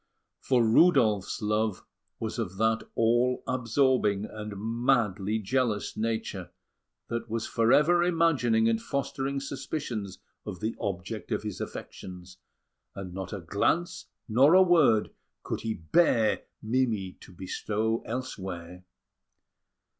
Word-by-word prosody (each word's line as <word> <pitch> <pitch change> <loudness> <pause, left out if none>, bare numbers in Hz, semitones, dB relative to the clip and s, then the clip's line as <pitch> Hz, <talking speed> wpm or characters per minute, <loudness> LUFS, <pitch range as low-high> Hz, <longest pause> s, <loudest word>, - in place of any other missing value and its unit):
For 125 -3 +2
Rudolf's 110 - +3
love 105 -1 0 0.3
was 110 +1 -4
of 95 -4 -4
that 110 +1 +1
all 120 +2 +2
absorbing 125 -4 +1
and 105 -1 -7
madly 110 -2 0
jealous 110 0 -1
nature, 110 -5 -3 0.6
that 115 0 -4
was 115 0 -2
for 115 0 +1
ever 155 +6 +5
imagining 150 -10 +2
and 115 0 +1
fostering 140 0 -2
suspicions 135 - -5 0.3
of 90 - -7
the 110 +1 -2
object 100 +3 -4
of - - -1
his 105 -3 -5
affections; 90 -1 -8 0.6
and 95 -2 -7
not 95 0 -6
a 100 - -5
glance 105 - -1 0.2
nor 135 +9 +5
a 190 - +8
word 150 - +4 0.3
could - - -4
he 110 0 -2
bear 110 - +2 0.2
Mimi 110 -5 0
to - - -13
bestow 105 +5 -2
elsewhere. 95 -8 -6
110 Hz, 120 wpm, -28 LUFS, 100-130 Hz, 0.6 s, a